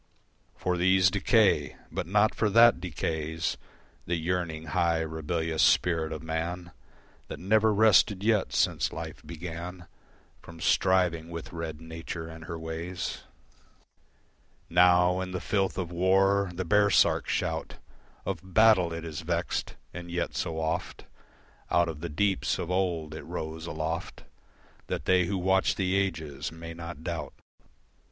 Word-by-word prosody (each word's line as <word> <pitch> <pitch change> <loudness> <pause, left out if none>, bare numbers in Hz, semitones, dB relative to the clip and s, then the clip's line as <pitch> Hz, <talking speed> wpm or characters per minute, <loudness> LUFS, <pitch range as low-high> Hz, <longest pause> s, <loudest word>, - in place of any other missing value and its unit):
For 90 -1 -1
these 95 +1 +4
decay: 105 +1 +3 0.2
but - - -3
not 105 +4 +3
for 110 - +1
that 115 +3 +6
decays 80 -1 -2 0.5
The 85 - 0
yearning, 85 -1 -2
high, 85 -1 +2
rebellious 80 0 -2
spirit 80 -1 +3
of 80 -1 -6
man 85 +2 -4 0.6
That - - -7
never 110 +3 +3
rested 105 -2 +4
yet 110 -2 +2
since - - +1
life 80 +1 -7
began 85 +2 -7 0.6
From 85 -1 -12
striving 90 -3 +2
with 85 -1 -7
red 80 -2 -5
Nature 80 0 -7
and 80 0 -10
her 85 - -5
ways. 80 +2 -5 1.5
Now 90 +1 +5
in 90 0 -5
the 90 - -2
filth 95 +1 -1
of 90 -3 -3
war, 95 +2 +3
the 90 +1 -4
baresark 105 +2 +3
shout - - -2 0.5
Of 95 -3 -2 0.2
battle, 110 -6 +5
it 85 0 -5
is 80 -2 -5
vexed. 85 +1 -2 0.2
And 85 -1 -8
yet 85 +1 -2
so 80 -1 -2
oft 80 +3 -3 0.6
Out 85 0 +3
of 80 -3 -5
the 85 - -4
deeps, 95 +5 0
of 85 - -4
old, 85 -5 -1
it 80 - -6
rose 80 +1 -6
aloft 80 +1 -4 0.6
That 65 - -4
they 90 +1 +4
who 95 +3 -2
watch 95 +1 +2
the 95 -1 0
ages 80 -8 -2
may 85 0 -8
not 85 -2 -8
doubt. 80 -5 -4
85 Hz, 140 wpm, -28 LUFS, 80-95 Hz, 1.5 s, that